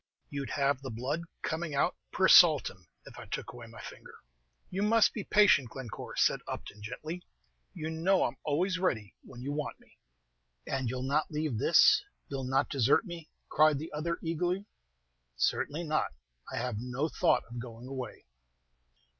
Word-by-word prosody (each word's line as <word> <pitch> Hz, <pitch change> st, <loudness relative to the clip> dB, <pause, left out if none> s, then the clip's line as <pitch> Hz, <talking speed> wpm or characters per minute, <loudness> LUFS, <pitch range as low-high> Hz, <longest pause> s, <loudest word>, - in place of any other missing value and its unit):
"You'd 140 Hz, -2 st, -4 dB
have 140 Hz, -2 st, +1 dB
the 135 Hz, -, -6 dB
blood 130 Hz, +8 st, -2 dB, 0.2 s
coming 160 Hz, -2 st, -2 dB
out, 155 Hz, +5 st, +2 dB, 0.2 s
per 190 Hz, -, +3 dB
saltim, 140 Hz, -, +6 dB, 0.2 s
if -, -, -11 dB
I -, -, -10 dB
took -, -, -5 dB
away 120 Hz, -1 st, -10 dB
my 115 Hz, 0 st, -12 dB
finger." -, -, -11 dB, 0.6 s
"You 190 Hz, -, -2 dB
must 220 Hz, +1 st, +4 dB
be 215 Hz, -, -4 dB
patient, 185 Hz, -, +5 dB
Glencore," 125 Hz, -3 st, -7 dB
said -, -, +3 dB
Upton, 105 Hz, -, -7 dB
gently; 155 Hz, +11 st, -6 dB, 0.5 s
"you 155 Hz, +1 st, -4 dB
know 180 Hz, +4 st, +2 dB
I'm -, -, -2 dB
always 180 Hz, +5 st, 0 dB
ready 115 Hz, -, -1 dB
when 125 Hz, -1 st, -11 dB
you 140 Hz, -, -3 dB
want 150 Hz, 0 st, -4 dB
me." -, -, -25 dB, 0.7 s
"And 130 Hz, -3 st, -2 dB
you'll 125 Hz, +1 st, -3 dB
not 145 Hz, +3 st, +1 dB
leave 150 Hz, -7 st, -2 dB
this, -, -, +6 dB, 0.3 s
you'll 135 Hz, -1 st, -3 dB
not 135 Hz, +2 st, +2 dB
desert 135 Hz, -, +3 dB
me?" 170 Hz, -4 st, -8 dB, 0.2 s
cried 155 Hz, -1 st, +4 dB
the 155 Hz, +3 st, -7 dB
other, 170 Hz, +3 st, -2 dB
eagerly. 175 Hz, +4 st, -1 dB, 0.7 s
"Certainly 150 Hz, -, 0 dB
not; 155 Hz, -, 0 dB, 0.4 s
I -, -, -4 dB
have 120 Hz, -3 st, -2 dB
no 125 Hz, +5 st, -2 dB
thought -, -, +2 dB
of 120 Hz, +1 st, -7 dB
going 115 Hz, 0 st, -9 dB
away." 130 Hz, -3 st, -6 dB
145 Hz, 165 wpm, -31 LUFS, 125-165 Hz, 0.7 s, saltim